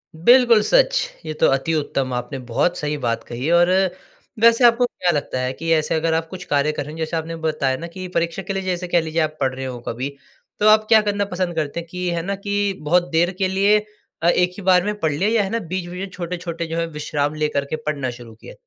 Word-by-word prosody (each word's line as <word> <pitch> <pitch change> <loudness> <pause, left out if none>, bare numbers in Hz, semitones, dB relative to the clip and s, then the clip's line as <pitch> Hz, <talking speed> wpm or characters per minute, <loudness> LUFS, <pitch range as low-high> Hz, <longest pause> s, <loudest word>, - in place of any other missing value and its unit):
बिल्कुल 235 +6 +5
सच! - - +4 0.3
ये 155 - -3
तो 155 - +3
अति-उत्तम 135 -2 0
आपने 125 +3 -4
बहुत 175 +9 +1
सही 150 0 -2
बात 115 -1 -1
कही 125 +5 -4
और 175 +1 +4 0.7
वैसे 230 +2 +5
आपको 240 +1 +5
क्या 180 -7 -1
लगता 145 -4 -2
है 130 0 -2
कि 165 +4 -3
ऐसे 155 0 +1
अगर 160 +1 +1
आप 165 0 0
कुछ 180 +1 -8
कार्य 145 -2 +1
करेंगे 150 +2 -6
जैसे 160 +1 -2
आपने 165 +1 -4
बताया 140 -4 0
ना 170 - -6
कि 185 -1 -6
परीक्षा 170 +2 0
के 195 - -4
लिए 195 0 -3
जैसे 180 -1 -2
कह 175 -1 +2
लीजिए 160 +1 -1
आप 155 0 -2
पढ़ 130 -1 +1
रहे 135 0 -5
हो 125 -2 -5
कभी, 125 +4 -3 0.5
तो 210 - +3
आप 215 0 +6
क्या 220 -1 +7
करना 205 -1 -1
पसंद 180 -3 -3
करते 155 0 -2
हैं 170 - -8
कि 180 0 -3
है 170 -1 -1
ना 200 +1 -1
कि 205 -1 0
बहुत 175 +4 +2
देर 170 +2 +2
के 190 - +1
लिए 200 +3 +3 0.5
अ, - - +3
1 180 0 +2
ही 200 - -8
बार 180 -1 +4
में 210 0 -2
पढ़ 160 -4 +1
लिया? 175 +9 0
या 225 -2 +2
है 195 - -3
ना 230 - -1
बीच-बीच 180 -1 -5
में 195 +1 -4
छोटे-छोटे 170 -2 -5
जो 165 +1 -4
हैं 165 - 0
विश्राम 150 -1 -2
लेकर 150 -2 -1
के 140 - -3
पढ़ना 140 -4 -2
शुरू 115 -2 -12
किया? 110 - -12
170 Hz, 240 wpm, -21 LUFS, 150-190 Hz, 0.7 s, क्या